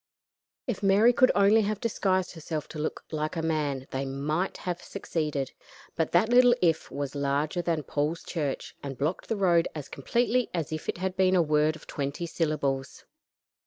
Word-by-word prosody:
If 245 Hz, -6 st, -3 dB
Mary 205 Hz, +5 st, +5 dB
could 255 Hz, +1 st, +5 dB
only 205 Hz, +2 st, +5 dB
have 210 Hz, -1 st, -1 dB
disguised 190 Hz, -5 st, 0 dB
herself 160 Hz, -2 st, -5 dB
to 155 Hz, -, -7 dB
look 155 Hz, -, -3 dB
like 155 Hz, +1 st, -2 dB
a 165 Hz, -, -2 dB
man 150 Hz, -5 st, -1 dB
they 135 Hz, +1 st, -2 dB
might 145 Hz, +7 st, -2 dB
have 180 Hz, -1 st, -4 dB
succeeded, 150 Hz, -5 st, -3 dB, 0.4 s
but 160 Hz, -1 st, 0 dB
that 175 Hz, +5 st, +4 dB
little 245 Hz, 0 st, +6 dB
"if" 165 Hz, -5 st, +1 dB
was 140 Hz, -2 st, -4 dB
larger 145 Hz, +4 st, 0 dB
than 165 Hz, -3 st, -1 dB
Paul's 150 Hz, +4 st, -2 dB
church, 150 Hz, -6 st, -3 dB
and 135 Hz, -2 st, -6 dB
blocked 155 Hz, +6 st, -2 dB
the 225 Hz, -, 0 dB
road 175 Hz, -4 st, +3 dB
as 150 Hz, -3 st, -6 dB
completely 240 Hz, -, 0 dB
as 160 Hz, -2 st, -2 dB
if 155 Hz, 0 st, -4 dB
it -, -, -1 dB
had 185 Hz, +1 st, -2 dB
been 185 Hz, 0 st, +3 dB
a 180 Hz, -, +5 dB
word 155 Hz, 0 st, +2 dB
of -, -, -13 dB
twenty 140 Hz, +3 st, -3 dB
syllables. 145 Hz, -5 st, -2 dB
160 Hz, 180 wpm, -28 LUFS, 145-190 Hz, 0.4 s, little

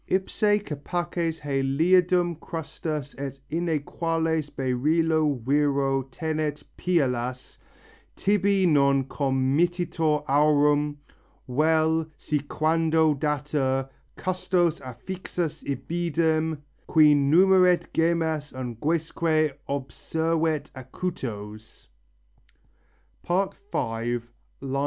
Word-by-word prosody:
Ipse 205 Hz, +2 st, +1 dB
capaces 165 Hz, +2 st, -3 dB
Heliadum 170 Hz, +5 st, +2 dB
crustas 155 Hz, -3 st, -5 dB
et 140 Hz, -1 st, -5 dB
inæquales 165 Hz, -1 st, -1 dB
beryllo 150 Hz, +3 st, +1 dB
Virro 140 Hz, -1 st, +2 dB
tenet 155 Hz, +1 st, -3 dB
phialas: 130 Hz, -7 st, -1 dB, 0.6 s
tibi 200 Hz, -1 st, +2 dB
non 140 Hz, -4 st, +4 dB
committitur 150 Hz, +4 st, 0 dB
aurum; 145 Hz, 0 st, +3 dB, 0.5 s
Vel, 160 Hz, +4 st, +2 dB
si 150 Hz, -, -1 dB
quando 160 Hz, +2 st, +2 dB
datur, 140 Hz, -2 st, -1 dB, 0.3 s
custos 180 Hz, -2 st, 0 dB
affixus 160 Hz, +5 st, -5 dB
ibidem, 160 Hz, +3 st, 0 dB, 0.3 s
Qui 155 Hz, -2 st, +6 dB
numeret 180 Hz, +5 st, +4 dB
gemmas 160 Hz, -3 st, 0 dB
unguesque 155 Hz, +5 st, 0 dB, 0.2 s
observet 160 Hz, +3 st, -1 dB
acutos 115 Hz, -, -7 dB, 1.3 s
(V. 190 Hz, +3 st, 0 dB, 0.2 s
38). 115 Hz, +1 st, -2 dB
155 Hz, 70 wpm, -26 LUFS, 140-165 Hz, 1.3 s, Qui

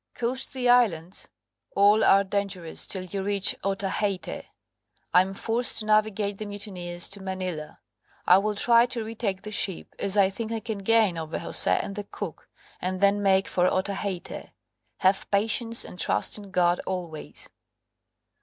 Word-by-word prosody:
Coast 255 Hz, +3 st, -3 dB
the 255 Hz, -2 st, -1 dB
islands, 200 Hz, -8 st, +2 dB, 0.5 s
all 205 Hz, +2 st, +5 dB
are 195 Hz, 0 st, +5 dB
dangerous 190 Hz, -4 st, -2 dB
till 190 Hz, -2 st, -2 dB
you 195 Hz, +2 st, -5 dB
reach 200 Hz, 0 st, +1 dB
Otaheite. 195 Hz, -2 st, -2 dB, 0.7 s
Am 190 Hz, +2 st, +3 dB
forced 230 Hz, +4 st, 0 dB
to 215 Hz, -, -1 dB
navigate 215 Hz, -1 st, +1 dB
the 215 Hz, -, -5 dB
mutineers 185 Hz, -4 st, 0 dB
to 200 Hz, 0 st, -4 dB
Manila, 185 Hz, -5 st, -5 dB, 0.5 s
I 180 Hz, +2 st, +6 dB
will 210 Hz, +1 st, -1 dB
try 235 Hz, +3 st, +4 dB
to 240 Hz, -2 st, -3 dB
retake 215 Hz, -3 st, -4 dB
the 215 Hz, -, -7 dB
ship, 195 Hz, -3 st, -2 dB
as 200 Hz, +1 st, 0 dB
I 195 Hz, -1 st, +4 dB
think 220 Hz, +3 st, -5 dB
I 225 Hz, -, -2 dB
can 220 Hz, -1 st, -5 dB
gain 210 Hz, -4 st, +2 dB
over 160 Hz, 0 st, -4 dB
Jose -, -, +1 dB
and 200 Hz, -, -6 dB
the 205 Hz, -, -4 dB
cook, 200 Hz, -5 st, -8 dB, 0.3 s
and 185 Hz, +1 st, -2 dB
then 200 Hz, +1 st, +3 dB
make 195 Hz, -1 st, +3 dB
for 180 Hz, 0 st, +1 dB
Otaheite. 190 Hz, -1 st, -3 dB, 0.5 s
Have 190 Hz, +1 st, +2 dB
patience, 225 Hz, +3 st, +2 dB
and 180 Hz, -, -11 dB
trust 105 Hz, -5 st, +1 dB
in 205 Hz, -2 st, -8 dB
God 175 Hz, -1 st, +2 dB
always." 175 Hz, -5 st, -6 dB
200 Hz, 155 wpm, -26 LUFS, 185-215 Hz, 0.7 s, I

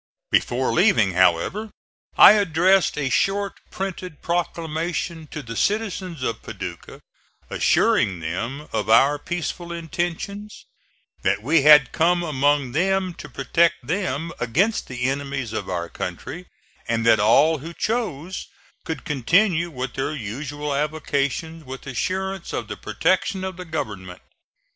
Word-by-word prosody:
Before 130 Hz, +2 st, +1 dB
leaving, 160 Hz, -, +4 dB
however, 95 Hz, -, +2 dB, 0.5 s
I -, -, +11 dB
addressed 190 Hz, -3 st, +3 dB
a 135 Hz, -3 st, -1 dB
short 200 Hz, 0 st, 0 dB
printed 185 Hz, -4 st, -6 dB
proclamation 170 Hz, -1 st, -2 dB
to 150 Hz, 0 st, -7 dB
the 115 Hz, -2 st, -7 dB
citizens 190 Hz, -, -1 dB
of 115 Hz, -3 st, -2 dB
Paducah -, -, -8 dB, 0.5 s
assuring 95 Hz, -5 st, +2 dB
them 115 Hz, -, -4 dB
of 110 Hz, -1 st, -1 dB
our 135 Hz, +6 st, +5 dB
peaceful 175 Hz, +1 st, -4 dB
intentions, 175 Hz, +5 st, -4 dB, 0.6 s
that 100 Hz, -, 0 dB
we 155 Hz, +5 st, +3 dB
had 150 Hz, -2 st, +7 dB
come 175 Hz, +2 st, +2 dB
among 145 Hz, -3 st, +1 dB
them 185 Hz, +4 st, +1 dB
to -, -, -10 dB
protect 155 Hz, +1 st, +1 dB
them 165 Hz, -1 st, -2 dB
against 180 Hz, -, +1 dB
the 125 Hz, -1 st, -5 dB
enemies 135 Hz, -3 st, -2 dB
of -, -, -4 dB
our 85 Hz, -2 st, -2 dB
country, 130 Hz, -, -6 dB, 0.4 s
and 115 Hz, 0 st, 0 dB
that 115 Hz, -2 st, +5 dB
all 140 Hz, +9 st, +4 dB
who 165 Hz, +5 st, -8 dB
chose 185 Hz, -, -3 dB, 0.4 s
could 160 Hz, -3 st, -5 dB
continue 170 Hz, -, +2 dB
their 135 Hz, +4 st, -3 dB
usual 145 Hz, +5 st, -4 dB
avocations 150 Hz, +2 st, -2 dB
with 130 Hz, -1 st, -9 dB
assurance 190 Hz, +7 st, -3 dB
of -, -, -3 dB
the -, -, -5 dB
protection 190 Hz, -3 st, 0 dB
of 190 Hz, -1 st, -4 dB
the 180 Hz, +1 st, -8 dB
government. 100 Hz, -, -5 dB
155 Hz, 130 wpm, -23 LUFS, 130-180 Hz, 0.6 s, I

